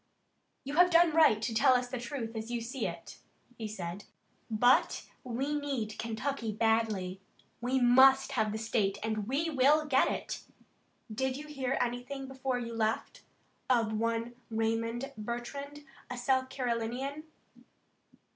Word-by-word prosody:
"You 280 - -5
have 355 +1 +7
done 340 -1 +5
right 310 -10 +5
to 230 - -1
tell 260 +3 +5
us 250 0 +1
the 250 0 -4
truth 235 -2 -5
as 220 +1 -5
you 240 0 -1
see 230 0 -3
it," 170 -1 -8 0.4
he 225 -2 -5
said, 190 -2 -6 0.4
"but 245 +3 +3 0.2
we 260 +3 -2
need 270 -8 -3
Kentucky 230 +1 -2
badly. 215 -4 0 0.4
We 255 +2 +1
must 265 +3 +6
have 220 -5 +1
the 215 - -3
state 220 -3 0
and 215 -2 -2
we 305 +6 0
will 295 +3 +4
get 270 -3 +3
it. - - -4 0.7
Did 265 +3 -1
you 300 - -7
hear 270 -3 -2
anything 245 +3 -3
before 265 -1 -2
you 235 -1 -5
left, 220 -1 -1 0.5
of 230 -3 +2
one 230 +2 -1 0.2
Raymond 230 +3 -1
Bertrand, 280 +6 -6 0.2
a 250 - -5
South 260 +1 +1
Carolinian?" 255 +3 -3
245 Hz, 145 wpm, -31 LUFS, 225-270 Hz, 0.7 s, have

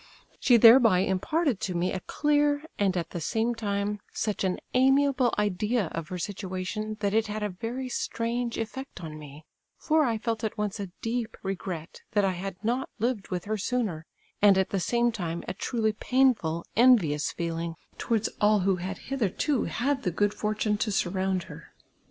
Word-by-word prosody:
She 245 -3 +5
thereby 225 -4 +7
imparted 235 - 0
to 185 - -3
me 175 +2 0
a 190 - -2
clear, 290 +5 +1 0.2
and, 195 -2 +2
at 170 - -3
the 175 - -4
same 225 +8 0
time, 205 -2 -2
such 210 -2 -2
an 185 -1 0 0.2
amiable 270 0 +4
idea 210 0 0
of 165 -1 -5
her 180 - -5
situation, 200 +3 -4
that 200 -1 0
it 220 0 +2
had 210 0 -3
a 210 - 0
very 230 +7 -5
strange 235 -1 -2
eifect 230 -2 -6
on 155 -1 -7
mo; 145 0 -11 0.4
for 315 0 +2
I 235 -5 +1
felt 225 0 -3
at 220 0 -2
once 210 0 -2
a 200 - -3 0.2
deep 230 0 -2
regret 180 -4 -5
that 205 -2 +3
I 190 - +2
had 185 +1 -5
not 245 +4 0
lived 230 -2 -1
with 180 -2 -4
her 215 +1 -2
sooner, 200 -8 -2 0.3
and 200 -2 +6
at 190 - +1
the 195 - 0
same 235 +6 +2
time 170 -6 -4
a 180 - -2
truly 220 +2 -1
painful 215 -9 +1
envious 205 - +4
feeling 165 0 -3 0.2
towards 225 -2 0
all 210 -1 +4
who 190 0 +2
had 185 +2 -4
hitherto 270 - -1
had 270 +3 -1
the - - 0
good 205 +4 +1
fortmie 210 0 -1
to 215 - 0
surround 190 -1 0
her. - - -12
210 Hz, 180 wpm, -27 LUFS, 185-235 Hz, 0.4 s, thereby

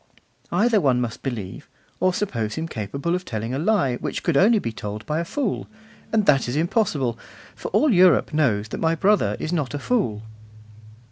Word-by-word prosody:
Either 220 -2 +3
one 130 -5 +3
must 120 -1 -3
believe, 110 -8 -6 0.3
or 185 0 +3
suppose 115 - -2
him 160 +1 -3
capable 140 - -3
of 180 0 -1
telling 115 -4 -4
a 135 - -1
lie 155 - +1
which - - -4
could 170 - +1
only 215 +9 +5
be 115 - -2
told 105 -1 -6
by 155 +1 -1
a - - 0
fool; 235 - -2 0.4
and 215 -2 +2
that 135 -4 +4
is 120 - -2
impossible, 150 - 0 0.4
for - - -6
all 300 - +3
Europe 180 -3 +4
knows 110 -9 +1
that - - -5
my 165 0 +2
brother 205 +5 +2
is 160 - -3
not 145 -5 -1
a - - -1
fool. 140 - -1
150 Hz, 190 wpm, -23 LUFS, 120-185 Hz, 0.4 s, only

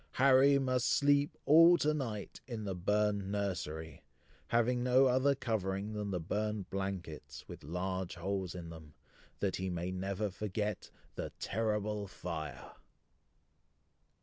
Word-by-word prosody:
Harry 135 +1 +6
must 130 -2 +1
sleep 145 0 +3
all 165 +4 +8
to 155 -1 +2
night 115 -9 -4
in 115 -4 -5
the 100 -2 -2
burned 100 +1 0
nursery, 80 -6 -3 0.4
having 120 +1 +2
no 125 +2 +5
other 130 +2 +3
covering 105 -4 -2
than 105 -1 -3
the 90 -2 -1
burned 105 +3 -2
blankets, 95 -5 -5
with - - -10
large 90 +4 -3
holes 95 +1 -3
in 85 -2 -7
them, 80 -2 -12 0.5
that 100 -2 0
he 95 0 -2
may 90 +1 -3
never 95 +2 -2
forget 105 +1 -3 0.2
"THE - - -5
TERRIBLE 105 -1 -1
FIRE!" 85 -5 -6
100 Hz, 130 wpm, -33 LUFS, 95-120 Hz, 0.5 s, all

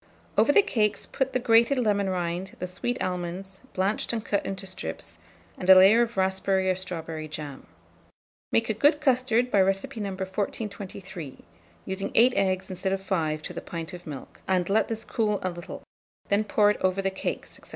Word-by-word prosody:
Over - - +5
the 405 - +6
cakes 215 - 0
put 265 0 -1
the - - +1
grated 235 +2 +4
lemon 205 -5 +1
rind, 180 +1 -3
the 180 - -3
sweet 215 +7 -3
almonds, 185 +1 -4
blanched 195 +3 0
and 230 -1 -3
cut 200 - 0
into 195 0 -4
strips, 185 -1 -5 0.4
and 185 - -3
a 190 - +11
layer 195 +5 +7
of 235 -2 -1
raspberry 190 0 +2
or - - 0
strawberry 165 -4 -5
jam. 150 -2 -7 0.8
Make 230 - +2
a 220 - +1
good 290 +8 +4
custard 250 -4 +2
by 200 - +5
recipe 195 +4 0
No. 205 -2 -2
1423, 190 - -5 0.4
using 190 +1 -3
8 245 +2 +6
instead 190 0 0
of 195 - -1
5 170 -5 0
eggs - - -5
to - - -8
the - - -5
pint 165 0 -6
of 175 -1 -9
milk, 140 -4 -9
and 185 -2 +1
let 220 +2 +3
this 225 0 -4
cool 210 -3 0
a 185 - 0
little; 175 0 -8 0.5
then 205 +2 +2
pour 210 0 +4
it - - -3
over 185 +1 +1
the 195 - +1
cakes, 190 - -5
&c. - - -13
195 Hz, 190 wpm, -27 LUFS, 185-220 Hz, 0.8 s, a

